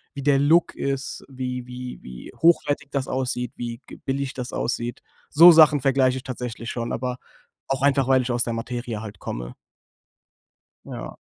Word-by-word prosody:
wie 140 - -5
der 140 -1 +4
Look 160 +4 +4
ist, 140 0 -3
wie 125 -1 -5
wie 125 0 -7
wie 60 -1 -10
hochwertig 150 -4 +3
das 135 -2 -2
aussieht, 125 -2 -2
wie 120 -1 -5
g - - -11
billig 135 0 -3
das 125 -1 -6
aussieht. 120 0 -3 0.3
So 170 +4 +9
Sachen 155 -3 +6
vergleiche 130 -1 +2
ich 130 - -7
tatsächlich 120 -2 -5
schon, 120 -1 -4
aber 125 +1 -3 0.5
auch 135 0 -2
einfach, 140 -2 +3
weil 130 -1 +4
ich 125 - -3
aus 120 0 +1
der 115 - -2
Materie 120 -1 -4
halt 105 -2 -9
komme. - - -6 1.3
Ja. - - -8
130 Hz, 170 wpm, -24 LUFS, 120-140 Hz, 1.3 s, So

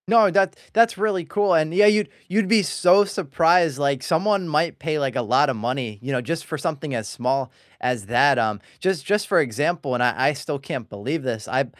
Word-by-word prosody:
No, 220 -3 +5
that 195 0 +2 0.2
that's 230 -1 +3
really 195 -4 -1
cool 205 -1 +1
and 155 -1 +2
yeah, 210 +3 +5
you'd 210 0 +3 0.2
you'd 200 +2 0
be 215 0 +4
so 180 +4 +3
surprised, 165 -3 +1
like, 140 -2 0
someone 185 +4 0
might 155 +1 -1
pay, 155 -2 -2
like, 135 -3 -2
a - - 0
lotta 135 +5 +2
money, 120 -1 -4
you 135 +3 -5
know, 125 -2 0
just 160 +5 -4
for 155 - -5
something 150 -2 -4
as 110 -3 -4
small 130 +2 -2 0.3
as 125 -5 -2
that, 125 +3 +3
um, 110 -3 -1 0.2
just 185 -7 -1
just 205 +3 0
for - - +3
example- 145 +3 -1
and 125 - -1
I 125 +2 +2
I - - -1
still 145 +1 -5
can't 135 -4 -7
believe 130 +11 -4
this- 115 -4 -4
I 130 +2 0
150 Hz, 215 wpm, -22 LUFS, 130-185 Hz, 0.3 s, No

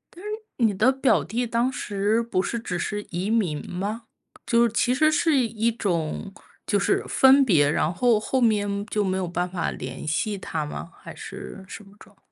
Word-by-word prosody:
嗯， 355 - -12 0.5
你 205 - -1
的 220 +7 +4
表 270 0 +2
弟 235 +7 -2
当 235 +3 0
时 210 -1 0
不 230 -5 0
是 235 +4 -3
只 180 -6 -4
是 205 +3 -3
移 185 +4 -3
民 185 -10 0
吗？ 205 +6 -4 0.4
就 235 0 +3
是 235 - +2
其 245 +2 +2
实 310 +2 +4
是 310 -1 +2
一 230 -2 +1
种 190 -2 -2 0.3
就 205 - +1
是 - - +1
分 270 +1 +6
别， 150 - +4
然 155 +2 +1
后 235 +1 +3
后 260 +4 -1
面 205 -3 +1
就 210 0 -1
没 190 -1 0
有 185 -2 -2
办 180 +1 -2
法 180 -2 -2
联 130 +4 -7
系 205 +6 -1
他 160 -4 -3
吗？ 165 +3 -7
还 - - -9
是 190 -1 -9
什 210 - -9
么 195 - -18
状 - - -17
况？ - - -44
210 Hz, 215 characters per minute, -24 LUFS, 185-235 Hz, 0.5 s, 分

